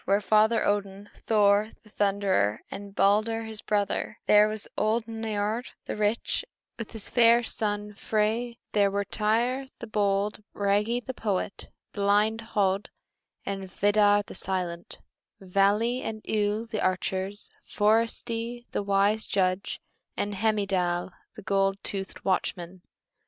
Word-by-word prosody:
There 195 Hz, -, +4 dB
were 205 Hz, -, 0 dB
Father 220 Hz, +2 st, +3 dB
Odin, 200 Hz, 0 st, -2 dB, 0.2 s
Thor 210 Hz, 0 st, +3 dB
the 215 Hz, -, -20 dB
Thunderer, 195 Hz, -, +1 dB
and 200 Hz, 0 st, -8 dB
Balder 215 Hz, +3 st, +2 dB
his 220 Hz, -1 st, -8 dB
brother; 205 Hz, -2 st, -1 dB
there 210 Hz, 0 st, +6 dB
was 215 Hz, -1 st, -2 dB
old 220 Hz, +2 st, +1 dB
Niörd 220 Hz, +1 st, -2 dB, 0.2 s
the -, -, -4 dB
rich, 210 Hz, -, 0 dB, 0.4 s
with 230 Hz, -, -6 dB
his 220 Hz, -3 st, -4 dB
fair 235 Hz, 0 st, +5 dB
son 210 Hz, -2 st, -2 dB
Frey; 220 Hz, +3 st, -1 dB
there 200 Hz, -1 st, +3 dB
were 200 Hz, +1 st, -1 dB
Tŷr 240 Hz, +6 st, 0 dB
the -, -, -7 dB
bold, 205 Hz, -1 st, 0 dB
Bragi 210 Hz, +4 st, +1 dB
the 260 Hz, -, -6 dB
poet, 200 Hz, -5 st, -3 dB, 0.2 s
blind 210 Hz, +2 st, +2 dB
Höd, 195 Hz, -1 st, +2 dB, 0.6 s
and 195 Hz, -1 st, -4 dB
Vidar 205 Hz, +1 st, +3 dB
the -, -, -11 dB
silent; 180 Hz, -2 st, -4 dB, 0.4 s
Vali 200 Hz, +6 st, +2 dB
and 220 Hz, -3 st, -5 dB
Ull 210 Hz, +1 st, 0 dB
the 220 Hz, -2 st, -4 dB
archers, 190 Hz, +2 st, -2 dB
Forseti 230 Hz, +2 st, 0 dB
the -, -, -1 dB
wise 200 Hz, +2 st, +2 dB
judge, 185 Hz, 0 st, 0 dB, 0.4 s
and 205 Hz, -, -1 dB
Heimdal 195 Hz, -4 st, 0 dB, 0.2 s
the -, -, -10 dB
gold 195 Hz, 0 st, +1 dB
toothed 195 Hz, -1 st, -4 dB
watchman. 180 Hz, -1 st, -2 dB
205 Hz, 130 wpm, -27 LUFS, 195-220 Hz, 0.6 s, there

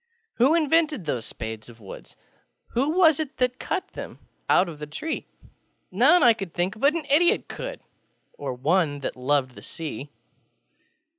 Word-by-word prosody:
Who 265 Hz, +7 st, +5 dB
invented 310 Hz, -, +2 dB
those 125 Hz, -6 st, -2 dB
spades 110 Hz, 0 st, -7 dB
of 120 Hz, -1 st, -15 dB
wood? 100 Hz, -3 st, -11 dB, 0.5 s
Who 265 Hz, +5 st, 0 dB
was 320 Hz, -5 st, +5 dB
it 305 Hz, -3 st, -4 dB, 0.2 s
cut 375 Hz, -, -3 dB
them -, -, -8 dB, 0.3 s
out 185 Hz, -, +5 dB
of 160 Hz, -3 st, -8 dB
the 150 Hz, -, -6 dB
tree? 310 Hz, -, -4 dB, 0.6 s
None, 355 Hz, -1 st, +5 dB
I 235 Hz, -, +7 dB
think, 195 Hz, 0 st, -3 dB
but 285 Hz, +5 st, +3 dB
an 325 Hz, -3 st, -3 dB
idiot 320 Hz, +5 st, +3 dB
couldŌĆö -, -, -6 dB, 0.5 s
Or -, -, -5 dB
one 145 Hz, +1 st, +1 dB
that -, -, -4 dB
loved 130 Hz, 0 st, 0 dB
the -, -, -12 dB
Sea. 150 Hz, -3 st, -6 dB
190 Hz, 150 wpm, -25 LUFS, -, 0.6 s, I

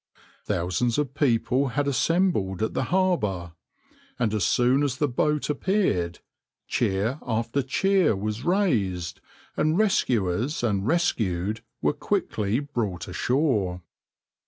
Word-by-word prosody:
Thousands 90 Hz, +7 st, 0 dB
of 145 Hz, -2 st, -1 dB
people 125 Hz, -1 st, +1 dB
had 145 Hz, -1 st, +1 dB
assembled 140 Hz, -, +1 dB
at 110 Hz, -, -1 dB
the 130 Hz, -, -1 dB
harbour, 105 Hz, -, 0 dB, 0.6 s
and 115 Hz, -3 st, 0 dB
as 105 Hz, -3 st, 0 dB
soon 125 Hz, +8 st, +3 dB
as 140 Hz, -3 st, 0 dB
the 150 Hz, -, +1 dB
boat 150 Hz, +3 st, 0 dB
appeared, 145 Hz, -, 0 dB, 0.5 s
cheer 105 Hz, +9 st, 0 dB
after 115 Hz, +3 st, -1 dB
cheer 185 Hz, -, +2 dB
was 105 Hz, +4 st, -3 dB
raised, 110 Hz, -, 0 dB, 0.3 s
and 155 Hz, +2 st, +1 dB
rescuers 125 Hz, -, +1 dB
and 100 Hz, -3 st, 0 dB
rescued 110 Hz, -, 0 dB, 0.2 s
were 75 Hz, -, +3 dB
quickly 105 Hz, +1 st, -1 dB
brought 120 Hz, -11 st, -3 dB
ashore. 100 Hz, -, 0 dB
120 Hz, 115 wpm, -25 LUFS, 95-150 Hz, 0.6 s, soon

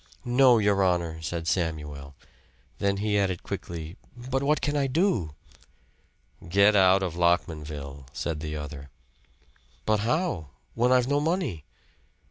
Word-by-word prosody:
"No, 125 Hz, 0 st, +5 dB
your 100 Hz, -2 st, +2 dB
honor," 85 Hz, -3 st, 0 dB
said 80 Hz, 0 st, -4 dB
Samuel. 75 Hz, -6 st, -3 dB, 0.6 s
Then 100 Hz, 0 st, +1 dB
he 105 Hz, 0 st, +1 dB
added 95 Hz, -3 st, -1 dB
quickly. 85 Hz, +2 st, -6 dB, 0.3 s
"But 135 Hz, +1 st, +1 dB
what 145 Hz, +1 st, +2 dB
can 145 Hz, +1 st, -1 dB
I 140 Hz, -1 st, +1 dB
do?" 130 Hz, -, 0 dB, 1.1 s
"Get 100 Hz, +3 st, +5 dB
out 95 Hz, 0 st, +5 dB
of 90 Hz, -4 st, -2 dB
Lockmanville," 75 Hz, -5 st, -1 dB
said 80 Hz, 0 st, -3 dB
the 75 Hz, 0 st, -5 dB
other. 75 Hz, -2 st, -7 dB, 1.0 s
"But 110 Hz, -1 st, +2 dB
how? 120 Hz, -, -1 dB, 0.3 s
When 120 Hz, +2 st, +2 dB
I've 125 Hz, -1 st, +4 dB
no 145 Hz, +1 st, +2 dB
money. 150 Hz, -, -1 dB
95 Hz, 130 wpm, -27 LUFS, 80-125 Hz, 1.1 s, No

